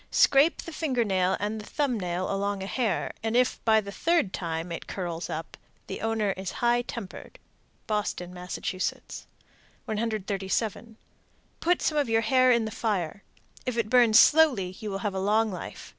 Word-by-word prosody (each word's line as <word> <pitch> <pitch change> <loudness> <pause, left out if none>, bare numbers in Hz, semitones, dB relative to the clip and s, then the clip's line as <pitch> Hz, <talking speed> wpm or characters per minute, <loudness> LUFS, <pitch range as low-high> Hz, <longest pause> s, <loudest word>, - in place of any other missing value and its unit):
Scrape 325 - +4
the 335 - -8
finger 265 -7 0
nail 190 -3 +1
and 210 +2 -2
the - - -11
thumb 275 -6 -1
nail 180 +1 -2
along 200 0 -2
a - - -4
hair, 215 -2 -1
and 225 +2 0
if, 250 0 +1
by 220 -1 +5
the 200 -2 -6
third 325 - +1
time, 165 0 -3
it 170 - -6
curls 175 -3 -4
up, 160 +1 -6 0.3
the - - -6
owner 225 -2 0
is 190 -1 -5
high 240 0 +2
tempered. 235 -5 -8 0.5
Boston, 205 -4 -2
Mass. 180 0 -6 1.3
137. 215 0 -2 0.6
Put 355 +1 +1
some 305 -1 +1
of 280 -5 0
your 225 0 +3
hair 255 +2 +4
in 235 -2 +3
the 220 - -4
fire. 200 -5 -2 0.5
If 250 -2 -2
it 230 -1 -1
burns 235 -3 +7
slowly 250 -14 +4
you 215 -2 -5
will 195 - -3
have 205 - 0
a 190 - -2
long 215 +3 +2
life. 180 - -8
215 Hz, 175 wpm, -27 LUFS, 190-240 Hz, 1.3 s, burns